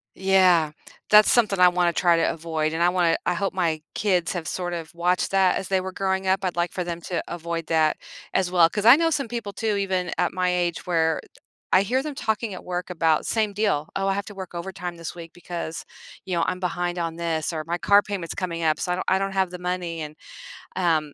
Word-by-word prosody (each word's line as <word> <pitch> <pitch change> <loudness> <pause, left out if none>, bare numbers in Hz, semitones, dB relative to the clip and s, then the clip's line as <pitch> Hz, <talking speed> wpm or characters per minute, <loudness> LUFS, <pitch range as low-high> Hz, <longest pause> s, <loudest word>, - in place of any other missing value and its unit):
Yeah. 185 -5 +4 0.4
That's 210 0 +7
something 210 -6 +3
I 180 - +8
wanna 175 -1 +1
try 175 -2 +3
to 165 - +2
avoid, 155 -1 -2
and 165 - -2
I 175 - +5
wanna 175 -2 +2
I - - +2
hope 195 +2 -2
my 165 -4 0
kids 185 -5 +1
have 170 -3 -4
sort 175 -1 -3
of 165 -1 -6
watched 180 +2 0
that 190 -1 +3
as 190 - -4
they 190 -1 +1
were 190 - -5
growing 190 0 -1
up, 190 +1 +2
I'd 180 - -1
like 175 0 0
for 180 - -3
them 170 -1 -5
to 180 - -2
avoid 170 -1 -4
that 160 -1 +2 0.4
as 190 -2 +1
well. 170 -2 +5
'Cause 205 +2 -3
I 240 +3 +10
know 330 +2 +2
some 280 -5 -1
people 230 -3 -5
too 220 0 -1
even 185 -3 -1
at 175 - +1
my 180 0 +1
age 175 -1 -1
where 160 -2 +1 0.5
I 185 - +7
hear 255 +6 0
them 295 -2 -5
talking 220 -2 -2
at - - -8
work 180 0 -4
about, 160 -3 +1
same 215 -2 0
deal, 195 -8 0
"Oh, 195 0 0
I - - +2
have 200 0 -3
to 205 - -10
work 190 -2 -8
overtime 180 0 -6
this 165 +1 -7
week 165 -1 -10
because, 170 -2 -6 0.4
you 185 -2 -2
know, 170 - +1
I'm 180 - -2
behind 175 -1 -2
on 165 -1 -2
this," 165 -1 -2
or 155 -1 -3
"My 170 +1 -2
car 200 +4 +5
payment's 195 -6 -5
coming 170 -2 -3
up, 155 -1 +2
so 180 - -2
I - - +1
don't 180 - -4
I 190 - +3
don't 195 0 -2
have 190 -2 +1
the 180 - -7
money," 180 -2 -3
and, 150 0 -7 0.6
um, 160 -5 +1
180 Hz, 240 wpm, -24 LUFS, 170-190 Hz, 0.6 s, I